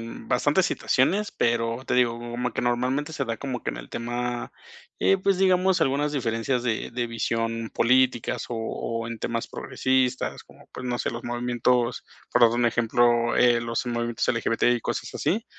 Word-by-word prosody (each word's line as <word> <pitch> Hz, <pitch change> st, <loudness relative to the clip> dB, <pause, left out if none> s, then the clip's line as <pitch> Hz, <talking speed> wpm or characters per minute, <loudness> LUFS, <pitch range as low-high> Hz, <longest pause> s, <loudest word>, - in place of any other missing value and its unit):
en 115 Hz, -, -9 dB
bastantes -, -, +2 dB
situaciones, 200 Hz, +11 st, +1 dB
pero 115 Hz, +1 st, 0 dB
te -, -, 0 dB
digo, 120 Hz, -2 st, +2 dB
como 120 Hz, 0 st, -3 dB
que -, -, -2 dB
normalmente 130 Hz, +5 st, 0 dB
se 140 Hz, -, -2 dB
da 115 Hz, -2 st, -3 dB
como 130 Hz, -2 st, -5 dB
que -, -, -2 dB
en -, -, -8 dB
el -, -, -9 dB
tema, 120 Hz, +1 st, -3 dB, 0.5 s
eh, 195 Hz, -, +4 dB
pues, 190 Hz, 0 st, +1 dB
digamos, 185 Hz, 0 st, +3 dB
algunas 145 Hz, +2 st, +1 dB
diferencias 120 Hz, -1 st, -1 dB
de 115 Hz, -3 st, -2 dB
de 120 Hz, 0 st, -2 dB
visión 115 Hz, 0 st, -2 dB
políticas, 125 Hz, 0 st, +2 dB
o 120 Hz, -, -3 dB
o 115 Hz, 0 st, -3 dB
en 115 Hz, -1 st, -6 dB
temas 115 Hz, 0 st, -3 dB
progresistas. 130 Hz, -1 st, -1 dB
Como, -, -, -19 dB
pues, 130 Hz, -, -7 dB
no 120 Hz, 0 st, -1 dB
sé, -, -, -1 dB
los 120 Hz, 0 st, -7 dB
movimientos, 120 Hz, 0 st, 0 dB, 0.3 s
por 120 Hz, -, +3 dB
dar 115 Hz, -, +8 dB
un 120 Hz, +1 st, +1 dB
ejemplo, 120 Hz, 0 st, +2 dB
eh, 120 Hz, -1 st, +4 dB
los 115 Hz, +1 st, -2 dB
movimientos 120 Hz, -1 st, -1 dB
LGBT, 115 Hz, -1 st, 0 dB
y -, -, -6 dB
cosas -, -, -4 dB
así. 220 Hz, +6 st, 0 dB
120 Hz, 180 wpm, -25 LUFS, 115-130 Hz, 0.5 s, dar